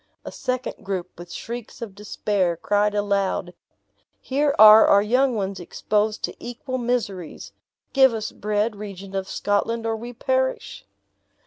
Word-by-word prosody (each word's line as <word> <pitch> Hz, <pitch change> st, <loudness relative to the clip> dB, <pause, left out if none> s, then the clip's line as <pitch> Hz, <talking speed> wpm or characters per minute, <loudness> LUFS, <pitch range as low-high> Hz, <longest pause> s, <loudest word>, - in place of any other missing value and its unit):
A -, -, -6 dB
second 255 Hz, 0 st, -4 dB
group, 185 Hz, -2 st, -4 dB
with 175 Hz, 0 st, -10 dB
shrieks 235 Hz, +5 st, -7 dB
of 230 Hz, -5 st, -7 dB
despair, 200 Hz, -3 st, -1 dB
cried 205 Hz, +3 st, +1 dB
aloud, 200 Hz, -3 st, 0 dB, 0.7 s
"Here 280 Hz, +2 st, 0 dB
are 215 Hz, 0 st, +9 dB
our 200 Hz, 0 st, +5 dB
young 250 Hz, +3 st, +2 dB
ones 195 Hz, -2 st, -3 dB
exposed 210 Hz, +4 st, -1 dB
to -, -, -3 dB
equal 255 Hz, +2 st, -5 dB
miseries. 210 Hz, -9 st, -3 dB, 0.4 s
Give 265 Hz, -2 st, +6 dB
us 220 Hz, -1 st, -4 dB
bread, 210 Hz, +1 st, -1 dB
Regent 195 Hz, -2 st, -8 dB
of 190 Hz, -1 st, -3 dB
Scotland, 225 Hz, +3 st, -1 dB
or 225 Hz, 0 st, 0 dB
we 235 Hz, +2 st, -7 dB
perish!" -, -, -2 dB
210 Hz, 140 wpm, -23 LUFS, 200-240 Hz, 0.7 s, are